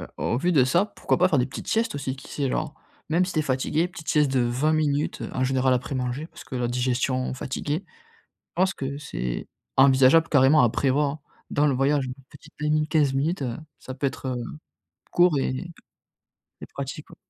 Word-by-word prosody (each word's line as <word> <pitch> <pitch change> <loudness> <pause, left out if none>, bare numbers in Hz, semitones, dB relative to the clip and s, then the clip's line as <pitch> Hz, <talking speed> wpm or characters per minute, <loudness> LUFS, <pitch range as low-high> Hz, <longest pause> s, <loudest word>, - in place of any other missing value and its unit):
Heu, - - -7
au 120 - -1
vu 175 +6 +1
de 140 -6 +5
ça, 175 +10 +2
pourquoi - - -1
pas 185 - +4
faire 150 - +2
des 125 - +2
petites 130 - -8
siestes 225 -7 +1
aussi 135 -1 -3
qui 135 - -13
sait, 140 -3 -1
genre - - -2 0.4
Même 175 +3 +3
si 185 - -4
tu - - -1
es 155 - +3
fatiguée, 145 +5 0
petite 165 -3 -11
sieste 150 -3 +3
de 130 - +2
20, 145 +4 0
heu, - - -5
en 130 - 0
général 130 0 +2
après 130 +2 -3
manger, 130 +4 -2
parce - - -13
que 130 -1 -6
la 125 - 0
digestion 130 +1 0
fatiguée. 145 +7 -3
Je - - -27 0.5
pense 185 +2 +2
que 140 +1 -4
c'est 60 - -4 0.3
envisageable 135 +4 +5
carrément 140 0 +5
à 120 - +4
prévoir 140 +4 0 0.3
dans 150 +1 +3
le 135 - +2
voyage 135 +1 +2
une 125 - -5 0.2
petite 145 - -16
20, 150 +1 +1
15, 145 +2 +1
heu, 120 -2 -3 0.2
ça 130 - -8
peut 140 +1 -1
être, 130 - -6
heu, 125 - -2 0.7
court 175 -4 +4
et 135 +6 -2 0.9
et - - -8
pratique, 140 +2 -6
ouais. - - -13
140 Hz, 205 wpm, -25 LUFS, 130-155 Hz, 0.9 s, de